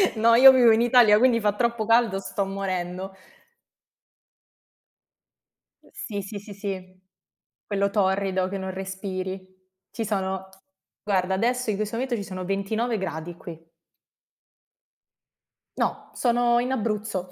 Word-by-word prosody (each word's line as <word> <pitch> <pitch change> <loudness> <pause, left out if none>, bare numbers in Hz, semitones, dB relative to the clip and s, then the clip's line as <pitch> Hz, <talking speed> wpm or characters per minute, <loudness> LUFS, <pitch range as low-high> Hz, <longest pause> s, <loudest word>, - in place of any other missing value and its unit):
No, 230 +1 +4
io 265 +3 +10
vivo 250 -3 +5
in 220 +1 +3
Italia, 235 -3 +6
quindi 240 0 +3
fa 210 -2 +1
troppo 235 0 -1
caldo, 225 -3 +3
sto 195 0 -3
morendo. 190 -1 -4 2.7
Sì, 205 -3 -6
sì, 200 +2 -7
sì, 205 +1 -10
sì. 185 -2 -7 0.6
Quello 200 -1 0
torrido 190 -2 0
che 200 - -4
non 190 0 -5
respiri. 190 0 -5 0.5
Ci 230 - -4
sono 190 -2 -3 0.6
guarda 190 -2 0
adesso 240 +4 0
in - - -2
questo 215 +1 -3
momento 250 +1 -2
ci 205 - -4
sono 185 -2 -7
29 215 +5 -1
gradi 175 -3 -5
qui. 165 -1 -11 2.1
No, - - -2
sono 240 -1 +2
in 250 +2 -2
Abruzzo. 210 -6 -3
200 Hz, 125 wpm, -25 LUFS, 190-230 Hz, 2.7 s, io